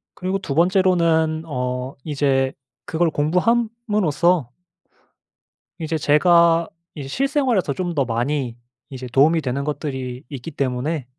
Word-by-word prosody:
그리고 190 +1 -2
2 140 -7 -4
번째로는 170 -3 +2
어 125 -2 -3
이제 135 -3 +1 0.3
그걸 165 +1 +1
공부함으로써 180 - +1 1.3
이제 160 0 -1
제가 170 +2 +4 0.3
이제 145 -4 -6
실생활에서 260 - 0
좀 175 +2 -3
더 140 - +2
많이 120 +1 -2 0.3
이제 130 -2 -7
도움이 145 +7 +4
되는 135 0 -2
것들이 130 -4 -4
있기 140 +2 -7
때문에 140 +2 -2
155 Hz, 260 characters per minute, -21 LUFS, 135-175 Hz, 1.3 s, 제가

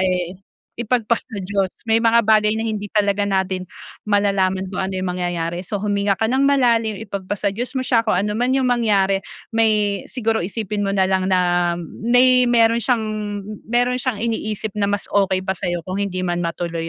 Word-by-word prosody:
eh, 180 -1 0 0.5
ipagpasa 235 -1 0 0.2
Diyos. 195 -1 0 0.2
May 225 0 +3
mga 230 0 +4
bagay 215 0 +3
na 225 - -2
hindi 210 -2 -3
talaga 205 -1 +1
natin 190 -2 -1 0.4
malalaman 195 -2 +1
kung - - -3
ano 190 0 -2
yung 185 -1 -2
mangyayari, 175 -1 -2
so 195 +3 -4
huminga 200 -1 0
ka 225 - -1
ng 255 +4 +1
malalim, 230 -6 +2
ipagpasa 200 0 -3
Diyos 245 +6 -5
mo 260 - -1
siya, 240 -3 +3
kung 220 -5 0
anuman 210 +6 0
yung 265 - +1
mangyari 200 -5 +2 0.3
may 210 -3 +2
siguro 225 -3 -1
isipin 210 +2 -3
mo - - 0
na 195 -1 +2
lang 190 0 0
na 175 -2 +2 0.2
may 250 +2 +4
mayro'n 230 -1 +4
siyang 235 -2 +1 0.6
mayro'n 245 +1 +1
siyang 250 -4 -1
iniisip 215 -2 -3
na 200 - +2
mas 205 0 -1
okey 190 -2 +1
pa 190 - 0
sa'yo 175 -3 -3
kung 185 +2 -3
hindi 185 -2 -2
man 175 0 -1
matuloy 170 -1 -3
205 Hz, 180 wpm, -20 LUFS, 185-225 Hz, 0.6 s, mga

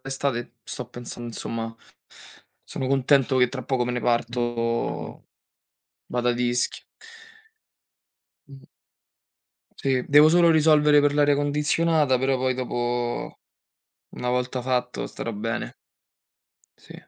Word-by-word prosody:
estate. 135 -3 -3
Sto 125 - -7
pensa 120 -1 -9
'nsomma, 115 -1 -5 0.9
sono 130 - -5
contento 135 0 +2
che 125 -1 +4
tra 130 0 -6
poco 125 0 -1
me 125 - -2
ne 125 - -2
parto. 120 0 -2 0.8
Vado 125 0 -1
ad 120 0 0
Ischia. 125 0 -1 1.6
Mh. 135 -1 -14 1.1
Sì, 130 -2 0
devo 150 +2 +7
solo 170 0 +5
risolvere 150 -2 +5
per 145 0 +3
l'aria 145 0 +3
condizionata. 150 0 +1
Però, 130 +1 +1
poi, 130 0 0
dopo, 120 -1 -3 0.8
una 125 - -3
volta 125 +1 -1
fatto, 125 0 -2
starò 115 - -6
bene. 115 +3 -4 1.0
Sì. - - -16
125 Hz, 110 wpm, -24 LUFS, 120-140 Hz, 1.6 s, devo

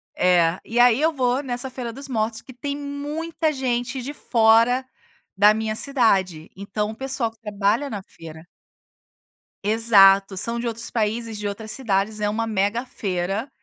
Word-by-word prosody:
É. 175 -1 +3
E 235 +2 -2
aí 245 +2 +5
eu 320 - +3
vou 255 -2 0
nessa 255 -1 -3
feira 250 -2 -5
dos 275 +4 -8
mortos 225 -3 -2
que 260 - -13
tem 280 +3 -5
muita 300 +3 -3
gente 255 -1 -2
de 280 +4 -6
fora 230 +1 +3 0.5
da 205 +2 +6
minha 220 0 -2
cidade, 195 - 0
então 210 +2 -3
o - - -10
pessoal 265 -2 -2
que 225 - -30
trabalha 210 +5 -1
na 205 -5 -6
feira 160 -2 -13 1.2
Exato. 200 -3 +5
São 230 +5 -1
de 235 - -3
outros 230 0 -5
países, 225 0 -2
de 210 - -3
outras 215 +2 -5
cidades, 215 -3 -1
é 210 - 0
uma 225 +2 -1
mega 215 +3 -1
feira. 195 +2 -3
225 Hz, 165 wpm, -23 LUFS, 205-255 Hz, 1.2 s, da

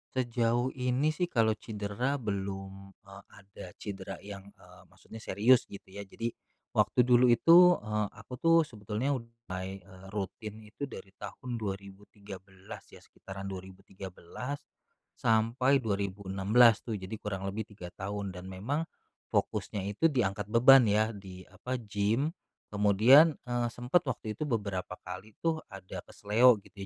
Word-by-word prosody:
Sejauh 120 0 +1
ini 130 +4 0
sih 175 +3 -1
kalau 115 -7 +2
cidera 110 +5 -3
belum, 95 -3 -5
eee, 95 0 -13
ada 100 -1 -13
cidera 95 -2 -7
yang, 100 -1 -9
eee, - - -17
maksudnya 110 - -13
serius 115 +5 +3
gitu 100 - -10
ya. 100 0 -8
Jadi, 115 +4 -4 0.4
waktu 125 - +3
dulu 125 0 +5
itu, 170 +9 +7
eee, 105 0 -1
aku 100 +6 -12
tuh 165 0 +5
sebetulnya 110 +1 -3
ud 120 -4 -3 0.2
mulai, 95 +1 -5
eee, 95 0 -15
rutin 105 +2 -5
itu 120 +7 -7
dari 95 -7 -10
tahun 120 +3 -6
2013 100 -1 -9
ya, - - -16
sekitaran 95 0 -9
2013, 95 +7 -8 0.5
sampai 120 +5 +2
2016 100 +2 +3
tuh. 115 -3 -3
Jadi 95 +2 -6
kurang 95 -2 -4
lebih 105 +2 -4
3 95 -4 -10
tahun. 100 0 -4
Dan 90 +1 -9
memang, 135 - -3 0.5
fokusnya 100 -2 -1
itu 165 +11 +3
diangkat 105 - -1
beban 125 +2 +7
ya, 110 +2 +2
di, 95 -3 -10
apa, 125 +7 -5
gym. 110 +6 0 0.4
Kemudian, 110 +10 +6
eee, 120 -1 -1
sempat 125 +9 0
waktu 110 -1 -3
itu 155 - -2
beberapa 100 -6 -2
kali 95 +4 -9
tuh 160 -1 +1
ada 95 -3 -8
keseleo 115 +4 +4
gitu 100 - -18
105 Hz, 140 wpm, -30 LUFS, 95-125 Hz, 0.5 s, itu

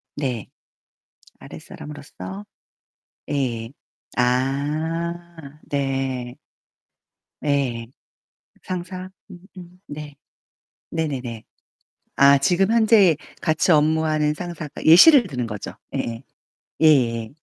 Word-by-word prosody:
네. 125 -7 -3 0.9
아랫사람으로서 105 -10 -9 0.9
예. 120 -5 -2 0.5
아 150 +5 -2
네. 135 -3 -2 1.0
네. 130 -6 -1 0.8
상사. 185 +1 -5 0.8
네. 145 -1 -8 0.8
네네네. 130 -8 -4 0.7
아 140 0 +6
지금 190 +8 +2
현재 215 -7 +5 0.3
같이 160 +3 +2
업무하는 155 0 +2
상사가 155 -3 -7
예시를 235 - +8
드는 125 -6 -3
거죠. 105 -3 -6 0.2
예예. 115 +2 -3 0.6
예예예. 120 -8 +3
145 Hz, 150 characters per minute, -22 LUFS, 125-165 Hz, 1.0 s, 예시를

